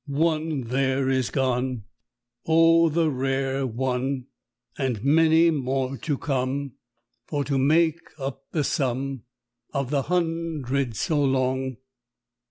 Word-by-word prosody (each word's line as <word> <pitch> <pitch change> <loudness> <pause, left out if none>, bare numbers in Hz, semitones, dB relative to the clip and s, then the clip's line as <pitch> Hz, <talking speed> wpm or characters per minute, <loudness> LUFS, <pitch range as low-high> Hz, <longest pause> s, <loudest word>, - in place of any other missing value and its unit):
One 155 0 0
there 130 +2 0
is 130 -2 +1
gone. 130 -3 -1 0.6
Oh, 165 +1 +5
the 160 0 +1
rare 135 0 -1
one! 130 +2 -2 0.5
And 125 -6 -2
many 160 +3 +5
more 135 -2 -1
to 145 0 -2
come 135 -1 -2 0.5
For 145 -2 -1
to 140 -1 0
make 160 +4 +3 0.2
up 135 -1 -5
the 155 - 0
sum 135 -2 -2 0.5
Of 140 -1 -1
the 140 -2 +2
hundred 160 -7 -1
so 145 +7 +1
long." 130 -1 0
135 Hz, 115 wpm, -25 LUFS, 130-155 Hz, 0.6 s, Oh